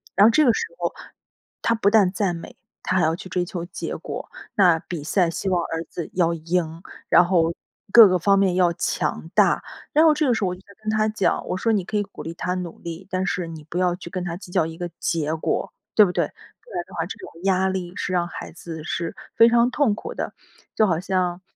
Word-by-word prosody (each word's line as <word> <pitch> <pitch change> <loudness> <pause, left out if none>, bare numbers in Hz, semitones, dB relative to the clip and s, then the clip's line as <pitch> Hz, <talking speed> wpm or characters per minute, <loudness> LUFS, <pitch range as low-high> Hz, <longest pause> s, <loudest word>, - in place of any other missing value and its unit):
然 200 - +6
后 - - +7
这 300 +6 +4
个 240 - +5
时 - - -2
候， - - -2 0.7
他 230 - +3
不 210 -3 +3
但 205 -4 +4
赞 190 -3 0
美， 165 - -10 0.3
他 185 - 0
还 175 - +3
要 160 +1 +2
去 185 - -10
追 180 -1 0
求 175 -1 -5
结 175 - -5
果。 - - -6 0.3
那 180 -6 +5
比 170 -3 -6
赛 175 +3 +2
希 170 +4 -4
望 180 -2 +2
儿 165 0 -3
子 170 - -6
要 170 -2 +2
赢， 165 0 -2 0.3
然 175 - +6
后 170 -2 +2 0.4
各 230 -3 +11
个 180 -1 +2
方 195 +3 +4
面 190 -2 +3
要 175 -2 +3
强 - - -2
大。 - - +3 0.3
然 310 - +6
后 320 -1 +6
这 300 -1 +1
个 245 - +4
时 220 - -1
候 185 - +2
我 180 - -3
就 185 - -16 0.2
跟 215 - -2
他 215 0 +2
讲， 215 -3 0
我 - - -1
说： 225 +5 +1
“你 195 -5 +1
可 215 - -5
以 205 - +2
鼓 200 - -11
励 165 - -5
他 180 +1 -2
努 180 -2 -6
力， 170 +3 -8
但 185 0 -1
是 180 -2 -2
你 160 -2 -9
不 175 - -4
要 180 -1 +2
去 175 -2 -10
跟 180 0 -4
他 170 -1 -3
计 180 -1 -11
较 160 - +2
一 165 0 -7
个 175 0 -4
结 160 -2 -1
果。 160 - -2 0.2
“对 210 - +8
不 180 - -1
对？ - - 0
不 - - -21
然 - - -2
的 - - -16
话 - - -1
这 - - -7
种 375 - -10
压 190 -1 +2
力 180 -2 -4
是 - - -3
让 175 -1 +1
孩 - - -8
子 165 -1 -8
是 170 0 -3 0.2
非 230 - +7
常 235 +1 +4
痛 255 -7 +2
苦 - - -7
的。 - - -4 0.4
就 215 - +4
好 170 -4 +1
像， 185 -1 -1
180 Hz, 265 characters per minute, -23 LUFS, 170-200 Hz, 0.7 s, 各